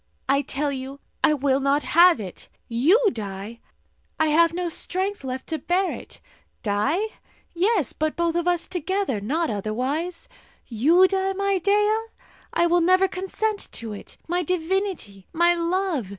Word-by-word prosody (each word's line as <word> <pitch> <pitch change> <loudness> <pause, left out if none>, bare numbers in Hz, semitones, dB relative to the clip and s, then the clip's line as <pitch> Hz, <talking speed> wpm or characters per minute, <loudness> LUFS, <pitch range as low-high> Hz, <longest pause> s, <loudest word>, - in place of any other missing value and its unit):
"I 275 +1 +3
tell 285 +1 -2
you, 270 +1 -6 0.2
I 305 - +5
will 275 -1 +1
not 280 +2 +1
have 345 -2 +5
it! 190 -4 -8 0.2
You 275 - +4
die? 205 +1 -7 0.6
I 315 -1 +3
have 335 +2 +4
no 355 +1 -2
strength 375 +2 -2
left 260 0 -5
to 320 - -2
bear 370 +2 0
it. - - -9 0.4
Die? 210 - +1 0.5
Yes; 365 - +1
but 310 0 -2
both 340 -1 0
of 345 +1 -1
us 350 -1 +1
together 360 - -2
not 310 +9 -1
otherwise. 255 - -3 0.4
You 315 +11 +4
die, 385 0 0
my 395 0 0
Dea? 420 +4 +2 0.5
I 340 - +2
will 345 0 +3
never 370 +3 +4
consent 395 +3 -3
to 225 -2 -5
it! 205 - -11
My 350 +2 0
divinity, 355 - -2
my 345 +1 +4
love! 340 - -1
335 Hz, 150 wpm, -24 LUFS, 265-370 Hz, 0.6 s, I